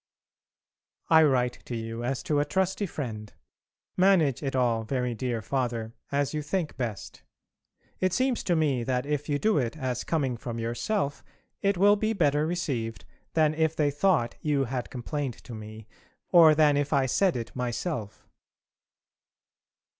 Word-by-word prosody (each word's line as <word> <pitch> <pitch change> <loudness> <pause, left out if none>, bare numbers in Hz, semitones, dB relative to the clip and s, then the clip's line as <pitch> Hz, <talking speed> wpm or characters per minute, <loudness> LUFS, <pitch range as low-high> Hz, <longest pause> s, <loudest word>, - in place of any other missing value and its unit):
I 160 0 +8
write 125 -5 +2
to 120 - -5
you 115 +1 -5
as 130 +2 -2
to 150 -2 +1
a 145 - +2
trusty 190 +5 0
friend. 110 - -6 0.6
Manage 180 -8 +3
it 135 -2 -3
all, 120 -3 +2
very 125 +1 -1
dear 115 -1 -3
Father, 115 -2 -2 0.2
as 140 0 0
you 155 - -1
think 160 +1 -2
best. 115 -5 -5 0.8
It 185 0 +1
seems 255 +4 0
to 175 - +2
me 145 -6 +1
that 125 +1 -1
if 150 0 -2
you 145 - +2
do 215 0 +2
it 120 +3 -2
as 130 -4 -2
coming 135 -7 -1
from 115 0 -6
yourself 140 - -2 0.4
it 200 -1 +1
will 205 +3 +5
be 215 +2 0
better 150 -5 +2
received 115 - -3 0.3
than 155 -2 +4
if 160 0 +1
they 145 -2 +2
thought 145 -6 +1
you 145 -3 +1
had 125 -1 -4
complained 135 0 -4
to 120 - -9
me, 110 0 -9 0.4
or 165 -3 +8
than 150 -2 +4
if 145 0 -1
I 135 -2 +3
said 185 +8 +2
it 115 -2 -5
myself. 125 - -4
140 Hz, 160 wpm, -27 LUFS, 120-160 Hz, 0.8 s, I